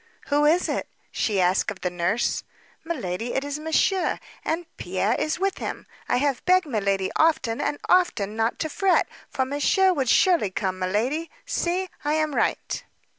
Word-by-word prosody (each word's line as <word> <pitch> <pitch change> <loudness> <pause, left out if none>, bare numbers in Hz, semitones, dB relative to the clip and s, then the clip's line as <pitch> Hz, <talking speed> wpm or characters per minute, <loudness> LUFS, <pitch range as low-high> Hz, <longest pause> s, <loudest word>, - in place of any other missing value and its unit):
"Who 295 0 +3
is 335 +4 +4
it?" - - -2 0.2
she 205 -3 0
asked 185 +3 +2
of 200 -2 -7
the 180 - -1
nurse. 180 +6 0 0.4
"Miladi, 240 - -3
it 270 - 0
is 285 +1 -4
monsieur; 320 +4 +1 0.3
and 330 +2 -1
Pierre 190 +4 0
is 310 +4 -1
with 390 0 0
him. - - -5 0.2
I - - +3
have 275 0 0
begged 370 0 +4
milady 200 -7 0
often 310 -8 +2
and 290 0 -1
often 235 - +2
not 225 +1 0
to 315 - -1
fret, 380 +4 +2 0.2
for 265 -3 0
monsieur 290 +8 +3
would 270 -7 0
surely 345 - +4
come; 185 0 -2
miladi, 235 - -1 0.2
see, 375 -6 -1 0.2
I 295 +1 +1
am 310 -1 0
right." - - -1
285 Hz, 170 wpm, -25 LUFS, 205-330 Hz, 0.4 s, is